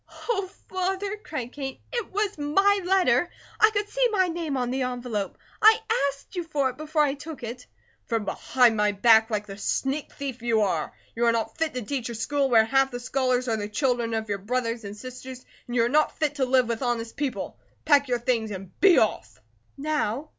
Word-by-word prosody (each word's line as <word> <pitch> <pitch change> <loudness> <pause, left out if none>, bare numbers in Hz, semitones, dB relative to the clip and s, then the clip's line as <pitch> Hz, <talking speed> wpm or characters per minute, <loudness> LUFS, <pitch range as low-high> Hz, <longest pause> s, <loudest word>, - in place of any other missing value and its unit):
"Oh, 395 -6 0 0.2
Father!" 385 +2 -2
cried 280 - -6
Kate. 270 -2 -6
"It 475 -3 -3
was 410 0 -1
my 390 +8 +3
letter. 350 -6 +3 0.3
I 435 - +7
could 415 -1 -1
see - - -1
my 375 -4 +2
name 330 -5 -2
on 245 -1 -1
the 265 +1 -1
envelope. 245 -5 -3 0.2
I 440 0 +8 0.3
ASKED 275 +6 -11
you 350 - -1
for 285 -5 0
it, 255 - -18
before 310 0 +1
I 280 -2 +1
took 290 -1 -9
it." 240 +2 -7 0.4
"From 225 -3 -1
behind 245 +3 +2
my 210 -1 +2
back, 220 +2 +5
like 210 -2 -2
the 195 0 -9
sneak 275 +7 -1
thief 270 -4 -6
you 230 -2 +2
are. 180 -6 0 0.2
You 235 +1 +1
are - - +6
not 225 -1 -2
fit 320 -4 -1
to 250 - -3
teach 245 +1 -3
in - - -4
a - - -7
school 275 +5 0
where 225 -3 +6
half 270 +3 +3
the 245 -1 -6
scholars 255 0 0
are 225 -2 +1
the 205 -1 -4
children 240 -1 0
of 220 0 -2
your 200 -1 -2
brothers 230 +1 -2
and 200 +1 -7
sisters, 255 +1 -9 0.2
and 245 - -5
you 230 - +4
are - - +2
not 300 +5 +2
fit 305 -2 0
to 265 - +2
live 255 -1 +3
with 230 +1 -2
honest 235 -2 -2
people. 280 -3 -4 0.3
Pack 285 -2 +5
your 245 -1 +1
things 235 -2 0
and 190 -2 -7
be 380 -3 +6
off!" - - 0 0.4
"Now? 295 -2 -1
255 Hz, 215 wpm, -26 LUFS, 230-305 Hz, 0.4 s, I